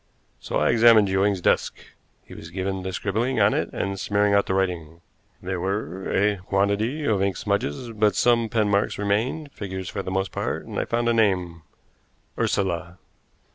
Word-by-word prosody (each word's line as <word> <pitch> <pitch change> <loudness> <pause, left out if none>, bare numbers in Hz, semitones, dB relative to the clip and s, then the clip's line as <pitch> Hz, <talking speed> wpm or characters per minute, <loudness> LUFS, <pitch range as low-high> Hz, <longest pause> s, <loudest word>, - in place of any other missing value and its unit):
So - - -3
I - - +3
examined 115 -3 +6
Ewing's 95 0 +1
desk. - - +1 0.5
He - - -13
was 80 - -10
given 95 +2 -3
to 95 0 -4
scribbling 110 +7 -1
on 100 0 +4
it - - -1
and 100 0 -3
smearing 100 +1 +1
out 100 0 +3
the 95 - 0
writing. 85 -4 -2 0.4
There 95 0 -3
were 95 -1 -3
a 105 +1 +2
quantity 100 +10 0
of 105 -7 +1
ink 100 -1 0
smudges, 100 - -2
but 105 -1 +1
some 115 -2 +3
pen 110 -1 +1
marks 100 0 +1
remained, 115 +9 -1
figures 95 -5 -6
for 100 - -4
the 95 - -6
most 95 0 -1
part, - - -3
and - - -4
I - - -1
found 120 0 -1
a 120 - +3
name 90 -7 +1 0.7
Ursula. 90 -2 -1
100 Hz, 175 wpm, -24 LUFS, 95-110 Hz, 0.7 s, examined